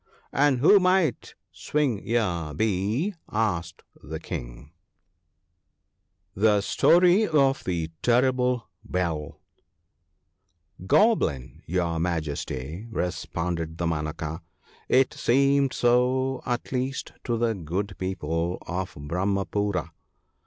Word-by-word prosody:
' - - -36
And 135 -3 +2
who 200 +8 +7
might 185 -8 +1 0.2
Swing 140 -9 -1
ear 90 -10 -1
be? 110 - 0
' - - -27 0.2
asked 85 -1 -7 0.2
the - - -6
King. - - -7 1.6
<@%t 95 - -10
j^torp 175 - +4
of 140 -4 +2
tlje 85 -3 -2
&tttMt 125 0 +2 0.3
USeflL 85 -5 -2 1.5
GOBLIN, 95 - +2
your 85 -1 0
Majesty,' 80 - -3
responded 85 -4 -3
Dama 85 -3 -1
naka, 80 +1 -5 0.3
' - - -30
it 135 - +2
seemed 140 +2 +3
so, 125 +2 +2
at 120 -1 -2
least, 130 +1 -3
to 120 -1 -1
the 115 0 +1
good 95 +2 -4
people 85 -2 -2
of 95 +3 -4
Brahmapoora. 100 +5 -1
100 Hz, 105 wpm, -26 LUFS, 85-130 Hz, 1.6 s, who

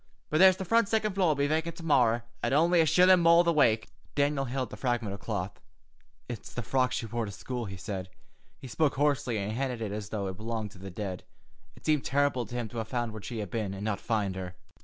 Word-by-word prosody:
But 155 - +2
there's 185 0 +7
the 190 - -4
frunt 230 +3 +3
siccond 215 -2 +1
floor'll 180 -5 +2
be 140 0 +1
vacant 160 +3 -1
to 170 - -10
morry, 120 -7 +3 0.2
at - - 0
only 170 +3 +4
a 160 - +2
shillun 180 +3 +6
more 170 +1 +6
the 170 -1 +2
wake." 115 -7 +3 0.3
Daniel 145 -1 +1
held 130 +1 -2
up - - -15
the - - -7
fragment 120 -5 -1
of 100 - -7
cloth. - - -4 0.7
"It's 120 -4 -7
the 120 - -4
frock 130 +2 +1
she - - -2
wore 115 +1 -2
to 100 - -6
school," 120 +5 -5
he 95 -2 -7
said. 95 0 -5 0.5
He 130 - -10
spoke 145 +4 +1
hoarsely 140 -5 +1
and 100 +1 -2
handled 125 +1 -2
it 105 -3 -3
as 105 0 -5
though 105 -2 -3
it 95 -1 -5
belonged 110 -1 -4
to 100 - -15
the 95 +1 -7
dead. 95 -1 -5 0.5
It - - -18
seemed 150 -3 +2
terrible 140 -4 +1
to 120 - -8
him 120 -2 -2
to 120 - -9
have 110 - -4
found 120 0 -2
where 110 - -7
she 110 +1 -5
had 100 -4 -6
been, 105 -4 -2
and 100 +2 -5
not 110 -2 -2
find 105 -4 -1
her. 90 -1 -6
120 Hz, 250 wpm, -29 LUFS, 105-150 Hz, 0.7 s, there's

